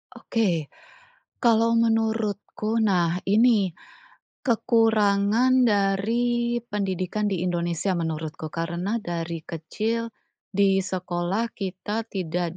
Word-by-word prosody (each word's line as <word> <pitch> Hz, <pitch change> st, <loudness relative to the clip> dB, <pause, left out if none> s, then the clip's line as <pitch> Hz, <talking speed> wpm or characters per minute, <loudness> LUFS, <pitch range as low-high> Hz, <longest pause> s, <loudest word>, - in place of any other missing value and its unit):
Oke. 175 Hz, -, -1 dB, 0.7 s
Kalau 230 Hz, -1 st, +4 dB
menurutku, 225 Hz, -1 st, 0 dB
nah, 180 Hz, -4 st, +2 dB
ini, 210 Hz, -1 st, +4 dB, 0.8 s
kekurangan 225 Hz, +1 st, +3 dB
dari 235 Hz, +4 st, +1 dB
pendidikan 200 Hz, -2 st, -2 dB
di 185 Hz, -3 st, -1 dB
Indonesia 175 Hz, +1 st, -1 dB
menurutku 160 Hz, -1 st, -4 dB
karena 175 Hz, +7 st, -2 dB
dari 170 Hz, -2 st, -4 dB
kecil 220 Hz, +8 st, -3 dB, 0.4 s
di 195 Hz, -1 st, +3 dB
sekolah 185 Hz, +4 st, -2 dB
kita 200 Hz, +3 st, -4 dB
tidak 175 Hz, -3 st, -3 dB
200 Hz, 85 wpm, -25 LUFS, 175-225 Hz, 0.8 s, Kalau